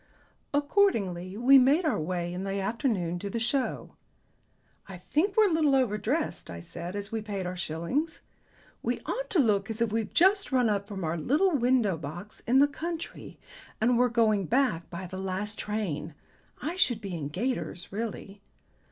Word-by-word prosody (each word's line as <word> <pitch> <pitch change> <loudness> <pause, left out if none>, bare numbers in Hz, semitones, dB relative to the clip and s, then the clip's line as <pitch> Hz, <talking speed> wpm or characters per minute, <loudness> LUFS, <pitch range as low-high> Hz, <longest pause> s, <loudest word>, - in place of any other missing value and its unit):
Accordingly 220 - +1
we 265 +4 +7
made 285 +7 +4
our 310 - +1
way 175 +2 -2
in 180 +1 -4
the 195 0 -2
afternoon 195 - -1
to 200 - -5
the 230 - -3
Show. 250 +3 -1 1.0
"I 190 - -7
think 335 - 0
we're 435 -1 +7
a - - +1
little 305 -4 +3
over 250 -6 +2
dressed," 285 +10 -2
I 85 - -6
said 175 - -7
as 205 0 -5
we 225 -1 -2
paid 200 -3 -4
our 180 +1 -3
shillings. 180 - -2 0.6
"We - - -2
ought - - -4
to 430 - +1
look 205 -6 +2
as 220 0 -4
if 230 -2 +1
we'd 220 -1 -2
just 390 +1 +4
run 250 -3 +3
up 200 -1 -1
from 195 -3 -5
our 160 +1 -1
little 300 - +2
window 245 - +2
box 170 +8 -8
in 250 +3 +4
the 285 +2 +7
country 330 +3 -6 0.4
and 240 +3 +3
were 245 +1 +4
going 220 -4 +2
back 245 -10 +1
by 180 +2 -6
the 185 +1 -7
last 195 +3 -3
train. 180 -8 -3 0.4
I 335 +4 -4
should 250 - +3
be 200 -4 -6
in 150 -4 -4
gaiters, 175 - -3
really." 205 -1 -5
215 Hz, 180 wpm, -28 LUFS, 185-270 Hz, 1.0 s, we